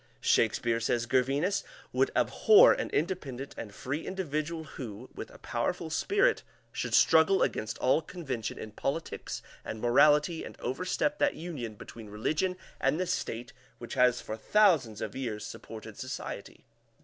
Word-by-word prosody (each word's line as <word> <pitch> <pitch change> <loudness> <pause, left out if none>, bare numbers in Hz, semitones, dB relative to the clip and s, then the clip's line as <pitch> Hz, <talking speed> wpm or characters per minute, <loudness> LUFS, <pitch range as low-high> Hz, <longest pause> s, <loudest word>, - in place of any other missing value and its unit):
"Shakespeare," 115 -1 +2
says 120 +1 0
Gervinus, 135 +10 +1 0.3
"would - - +3
abhor 440 +3 +6
an - - -3
independent 145 -6 -2
and 105 - -7
free 130 +9 -4
individual 165 -3 -3
who, 125 -5 -8
with - - -7
a - - -14
powerful 160 -2 -2
spirit, 395 - +2 0.3
should - - -1
struggle 165 +4 +5
against 110 - -2
all 130 +5 +3
convention 135 - -5
in 110 - -7
politics 145 +9 -4 0.2
and 110 - -5
morality 150 +7 +4
and - - -10
overstep 180 - -1
that 290 -1 +2
union 140 -10 -6
between 110 +1 -10
religion 155 - -1 0.2
and 155 - +1
the 185 - +1
State 125 -9 -3 0.2
which 120 - -8
has 125 -2 +3
for 110 - -5
thousands 150 - +3
of 105 - -4
years 115 -5 -4
supported 110 0 -9
society. 130 -1 -6
135 Hz, 145 wpm, -30 LUFS, 115-170 Hz, 0.3 s, abhor